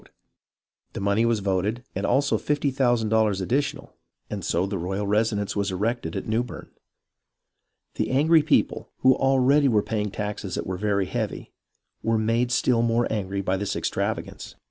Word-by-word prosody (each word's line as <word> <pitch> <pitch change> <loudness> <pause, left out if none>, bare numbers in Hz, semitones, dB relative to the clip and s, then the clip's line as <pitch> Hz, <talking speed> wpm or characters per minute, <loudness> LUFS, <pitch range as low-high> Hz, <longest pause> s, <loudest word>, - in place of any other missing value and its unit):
The - - -5
money 100 +4 +2
was 115 -3 +1
voted, 100 +5 -1
and - - -2
also 140 +1 +2
fifty 145 -1 0
thousand 120 -4 +1
dollars 110 -3 +2
additional, 135 +9 -2 0.4
and - - -4
so 85 +3 0
the 100 -1 -3
royal 95 +4 -2
residence 105 0 0
was 100 0 0
erected 100 -2 -2
at - - -3
Newbern. 115 +2 -3 1.2
The - - -2
angry 155 +5 +4
people, 150 - +1
who 130 0 +6
already 135 +2 +3
were 110 -5 +3
paying 105 -2 -2
taxes 105 -1 -4
that - - -3
were 95 0 -3
very 100 -1 0
heavy, - - -4 0.5
were 115 0 +1
made 115 +3 +1
still 125 -1 +2
more 115 0 +2
angry 100 -2 -2
by 95 0 0
this 100 +1 -2
extravagance. - - -3
110 Hz, 160 wpm, -25 LUFS, 100-125 Hz, 1.2 s, who